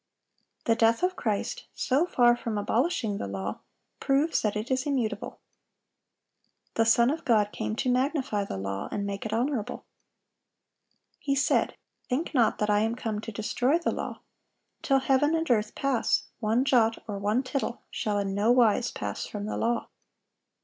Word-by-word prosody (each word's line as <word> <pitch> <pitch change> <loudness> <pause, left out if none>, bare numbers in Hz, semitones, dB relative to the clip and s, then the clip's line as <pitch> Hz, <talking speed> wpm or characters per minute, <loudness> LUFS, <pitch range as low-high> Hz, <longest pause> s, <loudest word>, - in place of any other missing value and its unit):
The 230 - +4
death 230 +5 +3
of 365 0 +2
Christ, 230 - -2
so 285 +7 +1
far 240 -6 +4
from 230 -3 -4
abolishing 225 - 0
the - - -3
law, 95 0 -4 0.4
proves 280 +4 +2
that 210 -1 0
it 215 +5 -3
is 260 +2 0
immutable. 255 -6 -2 1.3
The 225 - +2
Son 235 +2 +5
of 325 +2 -4
God 215 -6 +3
came 215 - -3
to 250 +2 0
"magnify 255 -5 0
the 95 - -5
law, 95 0 -4
and 200 - -2
make 200 +1 -4
it - - -7
honorable."(782) 235 0 -1 1.4
He 275 -2 0
said, 275 - +2 0.3
"Think 280 +8 -1
not 240 -5 +3
that 210 - 0
I 205 - +4
am 225 +2 0
come 220 -4 -3
to 225 - -6
destroy 245 +7 +1
the 340 - -1
law;" - - -5 0.6
"till 270 -1 +2
heaven 275 +4 +3
and 325 0 -1
earth 215 -2 +1
pass, 275 -3 +1 0.2
one 230 +3 +1
jot 230 -4 +3
or 205 -2 -4
one 210 +6 +1
tittle 260 -2 -3
shall 210 -1 -1
in 195 -1 -1
no 205 +4 +3
wise 240 -1 +4
pass - - -4
from 205 -1 -5
the 215 - -3
law." 235 0 0
230 Hz, 170 wpm, -28 LUFS, 210-270 Hz, 1.4 s, Son